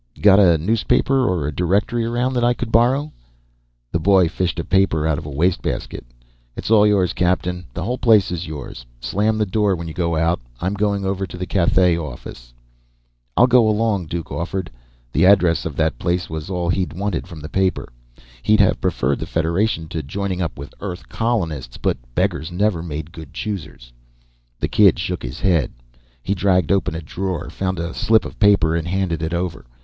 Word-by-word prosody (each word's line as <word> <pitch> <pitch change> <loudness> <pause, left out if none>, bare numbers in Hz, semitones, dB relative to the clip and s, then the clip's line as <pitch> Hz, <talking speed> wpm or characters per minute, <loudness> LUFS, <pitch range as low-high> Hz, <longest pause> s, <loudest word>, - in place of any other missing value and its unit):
"Got 100 -1 +6
a 85 -5 +5
newspaper 115 - +1
or 85 -6 -1
a 75 - -1
directory 100 +8 0
around 120 +3 0
that 120 -1 0
I 120 0 +3
could 120 -2 -5
borrow?" 130 +7 +3 0.8
The 85 - 0
boy 95 0 +4
fished 90 -1 -2
a - - -1
paper 95 -5 +2
out 80 -2 +1
of 75 - -9
a - - -5
wastebasket. 80 +6 -1 0.5
"It's - - -5
all 105 -1 +6
yours, 100 -4 +2
captain. 90 0 0
The 85 - -3
whole 125 +6 -2
place 110 -7 +4
is 90 0 -4
yours. 70 -5 -7 0.2
Slam 105 - 0
the 105 - +1
door 100 0 +1
when 85 -1 -6
you 80 - -6
go 85 -2 -1
out. 80 -2 +1 0.2
I'm 95 +3 -1
going 100 -1 0
over 95 0 -2
to 90 - -9
the 90 - -3
Cathay 90 -1 +2
office." - - -8 0.9
"I'll 125 - +7
go 125 -3 +4
along," 105 -5 0
Duke 85 +1 -5
offered. 90 -2 -3 0.4
The 80 - +3
address 90 -5 +4
of 75 - -7
that 80 -1 0
place 85 -1 -1
was 80 +2 -5
all 90 -2 -2
he'd 90 -3 0
wanted 95 -1 -3
from 85 -4 -10
the 75 - -6
paper. 95 +3 0 0.5
He'd 110 - +3
have 100 - +3
preferred 70 -7 0
the - - -5
Federation 85 +1 0
to 80 - -3
joining 95 +5 -3
up 85 - -3
with 70 +1 -9
Earth 90 -6 -7
colonists, 80 - -2
but - - 0 0.2
beggars 80 +3 0
never 95 -1 0
made 80 -1 -6
good 80 -5 -11
choosers. 75 - -6 0.7
The - - 0
kid 100 -4 +5
shook 90 +1 -3
his 65 +1 -7
head. 85 -8 +2 0.5
He 100 - 0
dragged 95 -3 +2
open 95 -5 +1
a 80 - -5
drawer, 90 +2 -4
found 95 -1 -2
a 85 0 -4
slip 110 0 +2
of - - -9
paper, 100 -6 +4
and 85 0 -2
handed 90 -3 -1
it 80 +1 -2
over. 85 -7 -4
90 Hz, 195 wpm, -20 LUFS, 80-100 Hz, 0.9 s, I'll